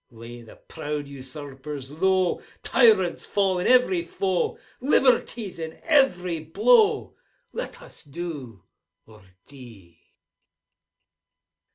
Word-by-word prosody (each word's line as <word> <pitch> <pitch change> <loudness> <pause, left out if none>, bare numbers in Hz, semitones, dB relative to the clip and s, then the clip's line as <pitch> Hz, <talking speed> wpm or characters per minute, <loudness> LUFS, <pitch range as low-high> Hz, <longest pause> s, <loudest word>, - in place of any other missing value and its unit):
Lay 120 0 -11
the 115 - -14
proud 150 -2 -6
usurpers 140 0 -8
low! 185 +3 +1 0.2
Tyrants 210 -8 +3
fall 195 -3 0
in 180 - -1
every 245 -9 +4
foe! 185 +1 -1 0.2
Liberty's 245 - +1
in 160 -1 -7
every 185 - +2
blow! 425 - +3 0.2
— - - -43
Let - - -6
us - - -13
do, 140 - -7 0.4
or 110 -1 -17 0.2
die! 115 -11 -14
165 Hz, 100 wpm, -25 LUFS, 135-200 Hz, 0.4 s, every